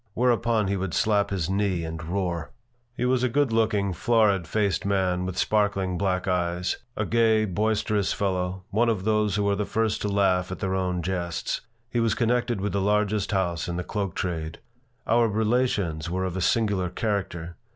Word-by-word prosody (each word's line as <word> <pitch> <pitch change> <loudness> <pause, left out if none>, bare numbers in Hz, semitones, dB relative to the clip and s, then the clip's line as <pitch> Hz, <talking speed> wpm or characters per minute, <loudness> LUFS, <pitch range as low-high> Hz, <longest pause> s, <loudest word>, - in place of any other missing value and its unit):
Whereupon 115 -3 +2
he 100 +1 0
would 95 -2 -3
slap 100 -2 +2
his 90 -5 -1
knee 95 -3 0
and 80 0 -5
roar 85 -1 -2 0.5
He - - 0
was 125 0 +2
a 125 - +2
good 140 -1 +1
looking, 105 -4 +1
florid 105 -4 +2
faced 100 +1 0
man 95 -2 0
with 90 -1 -5
sparkling 100 -4 +1
black 90 0 -1
eyes 90 0 0 0.2
a 105 - 0
gay, 110 -1 +3
boisterous 105 +1 0
fellow, 95 -1 -1
one 115 +4 +2
of 105 -5 -1
those 105 -2 +1
who 105 -1 +1
are 100 - +2
the 105 - -1
first 110 +1 -1
to - - -1
laugh 95 -2 +2
at 90 - -4
their 95 -2 -2
own 90 -2 -1
jests. 85 -3 -2 0.3
He 120 0 -1
was 115 -2 +2
connected 120 -1 +1
with 105 +2 -2
the 100 - +1
largest 105 0 +1
house 90 -4 0
in 85 - -3
the 90 - -2
cloak 100 -3 -3
trade. 80 -3 -3 0.5
Our 115 +1 +3
relations 105 -7 0
were 95 +2 -1
of 90 -1 -3
a 95 - -2
singular 100 -3 +1
character. 90 -4 -3
100 Hz, 185 wpm, -26 LUFS, 90-110 Hz, 0.5 s, gay